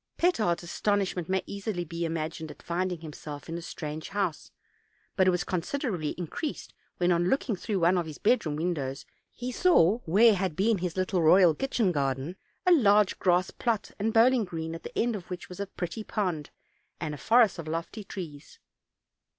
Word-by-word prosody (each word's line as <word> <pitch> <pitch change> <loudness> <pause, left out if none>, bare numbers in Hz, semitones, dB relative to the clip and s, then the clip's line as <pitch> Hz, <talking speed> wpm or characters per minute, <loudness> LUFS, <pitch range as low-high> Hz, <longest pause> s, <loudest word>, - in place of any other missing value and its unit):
Petard's 215 - +2
astonishment 185 -1 -1
may 190 0 +1
be - - -9
easily 200 -3 -3 0.2
imagined 160 0 -3
at 150 - -12
finding 175 0 -2
himself 150 -2 -8
in 165 - -5
a 170 - -4
strange 155 -2 -6
house; 195 -5 -2 0.7
but 190 -1 +3
it - - +7
was 180 -1 +1
considerably 185 - -2
increased 180 - -5 0.2
when, 175 0 +2
on 175 +1 +2
looking 270 -5 +1
through 200 +2 -2
one 175 +2 +4
of 170 - -3
his 155 - -8
bedroom 210 -9 +2
windows, 150 -5 -2 0.3
he 250 +1 -5
saw, 235 - +4
where 210 +7 +6
had 185 -4 -1
been 205 +2 +2
his 180 0 -3
little 185 -1 +1
royal 170 +1 +6
kitchen 235 - 0
garden, 140 +2 -1 0.3
a 365 - +5
large 210 - +4
grass 180 0 +2
plot 230 -4 -1
and 220 +3 +1
bowling 235 +2 +5
green, 165 -3 -5
at 165 - -7
the - - -8
end 235 0 +1
of 185 -4 -8
which 180 -1 -6
was 180 - -9
a 200 - -1
very - - -41
pretty 180 +5 -4
pond, 180 -10 -2 0.5
and 155 -3 -3
a - - -6
forest 225 -6 +4
of 160 - -6
lofty 165 +7 -4
trees. 165 -7 -8
180 Hz, 185 wpm, -28 LUFS, 165-210 Hz, 0.7 s, it